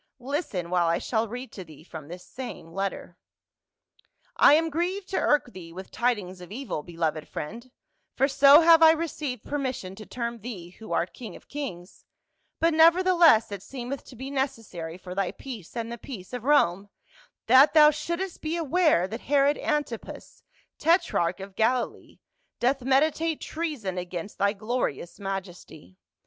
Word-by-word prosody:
Listen, 250 - -3
while 175 -2 +2
I 165 0 +2
shall 225 -1 -1
read 250 +4 -7
to 190 - -8
thee 155 -3 -15
from 160 -4 -10
this 175 +2 -9
same 250 -10 -8
letter. 195 -2 -4 0.4
" - - -63
' - - -46 0.2
I 290 - +7
am 325 +1 +1
grieved 360 +5 -2
to - - 0
irk 290 -5 +1
thee 170 -3 -10
with 185 +3 -9
tidings 205 -7 -1
of 180 - -11
evil, 235 - -4
be 170 +1 -13
loved 155 -2 -1
friend 230 +11 -7 0.2
— - - -49
for 270 - +4
so 280 +2 +7
have 330 0 +7
I 320 0 +8
rcceiv^ed 295 -7 -4
permission 260 -10 -3
to 215 +2 -11
term 235 -1 -4
thee, 195 -6 -8
who 220 +4 -12
art 175 - 0
king 235 -4 -9
of - - -15
kings 200 -11 -7 0.3
— - - -48
but 330 0 +3
nevertheless 335 - +5
it 200 -2 -5
seem 250 +3 -6
eth 275 - -6
to 255 - -13
be 265 +3 -7
necessary 225 -12 -4
for 180 -1 -9
thy 195 -1 -1
peace 240 -6 -9
and 230 0 -3
the 235 - -6
peace 215 -6 -9
of 250 -1 -5
Rome 200 -9 +3 0.6
that 260 +6 +6
thou 300 -1 +8
shouldst 340 +5 -4
be 320 +2 -2
aware 315 - +2
that 225 +5 -6
Herod 285 0 +2
Antipas, 295 -7 -4 0.4
tetrach 320 - +2
of 195 0 -9
Galilee, 240 +2 -1 0.4
doth 265 +2 +1
meditate 305 +5 +1
treason 285 - -4
against 180 +2 -7
thy 200 +1 +2
glorious 215 - -3
majesty. 180 - -7
240 Hz, 175 wpm, -26 LUFS, 185-290 Hz, 0.6 s, I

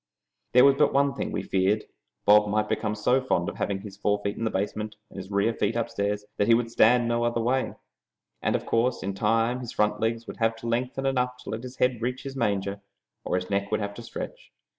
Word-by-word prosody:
There 125 +2 +8
was 140 0 +5
but - - +4
one 140 0 +3
thing - - -4
we - - -2
feared: 100 +3 +1 0.4
Bob 105 0 +6
might 105 +1 +1
become 105 -1 -1
so 125 +5 +2
fond 90 -9 0
of - - -5
having 95 -1 -2
his 100 -1 -10
forefeet 105 0 0
in 115 - -3
the - - +1
basement 105 +2 -3 0.2
and - - -12
his 95 0 -7
rear 100 +3 +1
feet 105 0 -1
upstairs, 105 -3 -1
that 105 - +2
he 115 - +7
would 115 -1 -1
stand 120 +1 +4
no 120 0 +1
other 120 0 0
way, 125 +3 0 0.7
and - - +1
in - - -2
course 120 +2 +1
of 100 0 -2
time 115 +5 +1
his 120 -2 -6
front 105 0 +1
legs 115 +1 -1
would - - -8
have 115 -1 +1
to 115 +1 -8
lengthen 125 +3 -1
enough 125 -2 0
to - - -6
let 110 - -4
his 125 +1 -9
head 125 -2 +1
reach 125 +2 -2
his 135 -1 -6
manger, 100 -4 -1 0.4
or - - -1
his 90 +2 -3
neck 100 0 0
would 110 - 0
have 100 -1 -3
to 120 - -9
stretch. - - -8
115 Hz, 235 wpm, -26 LUFS, 105-125 Hz, 0.7 s, There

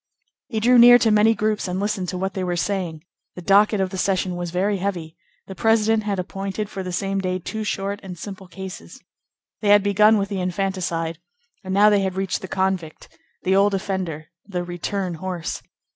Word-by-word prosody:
He 225 -4 -2
drew 245 +3 +5
near 245 +1 +9
to 225 -2 +2
many 215 +2 +4
groups 215 -2 -1
and 180 +1 -2
listened 195 -3 -2
to 185 - -4
what 190 +1 -2
they 190 - -3
were 180 -1 -1
saying. 175 -4 -2 0.3
The 180 - -8
docket 205 +2 +4
of 190 -1 0
the 190 - -4
session 185 -1 0
was 175 0 -4
very 195 +4 0
heavy; 175 -4 -4 0.3
the 190 - -8
president 225 +2 +2
had 200 -2 -1
appointed 195 +3 -4
for 195 - -5
the 185 -1 -5
same 195 +2 -1
day 185 -1 -1
two 220 +4 -5
short 200 -1 -3
and 185 -2 -8
simple 190 +1 -8
cases. 185 - -9 0.6
They 205 - +1
had 205 -1 +6
begun 210 +2 +4
with 200 -1 -1
the 195 -2 -3
infanticide, 180 -3 -2 0.4
and 190 - -6
now 205 +2 +5
they 205 -1 +3
had 190 -1 -2
reached 190 0 -2
the 190 - -6
convict, 185 -4 -2 0.3
the 190 +1 +2
old 200 +1 +4
offender, 180 -5 -4
the 180 -3 -4
"return 175 +1 -3
horse." 180 -3 -4
195 Hz, 200 wpm, -22 LUFS, 180-205 Hz, 0.6 s, near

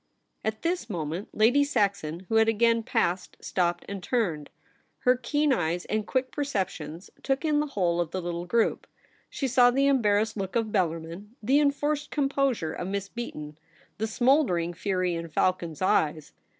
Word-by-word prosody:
At 215 0 -3
this 335 -8 -1
moment 170 +1 -4
Lady 245 +7 +4
Saxon, 200 - 0
who 225 - +2
had 220 0 +5
again 230 +1 +3
passed, 180 -4 -1
stopped 175 -1 -1
and 200 -1 -5
turned. 175 - -1 0.5
Her 250 -1 +4
keen 290 +4 +1
eyes 175 -4 -1
and 215 -1 -2
quick 260 -1 -1
perceptions 185 - -3
took 270 +3 -1
in 300 -1 +2
the 300 - 0
whole 175 -9 0
of 170 - -2
the 185 - -3
little 175 0 -4
group. 230 +4 +1 0.4
She 275 - -2
saw 245 -1 +5
the 270 +3 +2
em 275 -2 +3
barrassed 215 +1 +1
look 195 +1 -4
of 225 -2 0
Bellarmin; 175 +3 -2
the 270 +6 +4
enforced 295 +1 0
composure 275 - 0
of 180 - -5
Miss 200 0 -3
Beaton; 150 -11 -7 0.4
the 220 - 0
smouldering 225 - +2
fury 185 0 -1
in 165 0 -4
Falcon's 170 0 0
eyes. 155 -4 +1
210 Hz, 165 wpm, -27 LUFS, 175-255 Hz, 0.5 s, had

